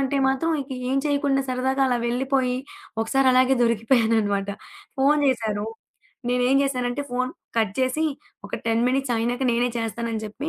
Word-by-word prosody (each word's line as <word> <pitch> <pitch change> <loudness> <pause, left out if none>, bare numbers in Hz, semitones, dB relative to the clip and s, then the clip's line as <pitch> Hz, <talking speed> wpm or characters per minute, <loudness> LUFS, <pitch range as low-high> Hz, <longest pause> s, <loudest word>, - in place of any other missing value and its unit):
అంటే 275 +1 0
మాత్రం 270 +5 0
ఇక 270 - -17 0.2
ఏం 265 - +1
చేయకుండా 285 -2 +1
సరదాగా 260 +2 0
అలా 250 -1 +1
వెళ్ళిపోయి, 255 +1 0 0.4
ఒకసారి 265 +4 +2
అలాగే 255 +1 +4
దొరికిపోయాననమాట. 225 -3 +2 0.5
ఫోను 290 +2 +4
చేశారు. 220 -5 -1 0.6
నేనేంచేశానంటే, 250 +1 +1
ఫోను 255 +1 -1 0.2
కట్ 215 -3 +2
చేసి, 260 +5 +1 0.4
"ఒక - - -17
10 225 0 +2
మినిట్స్ 265 -1 0
అయినాక 240 +3 -1
నేనే 240 +1 +2
చేస్తాను" 230 +1 -3
అని 220 - -2
చెప్పి, 265 +9 -5
255 Hz, 145 wpm, -24 LUFS, 230-270 Hz, 0.6 s, అలాగే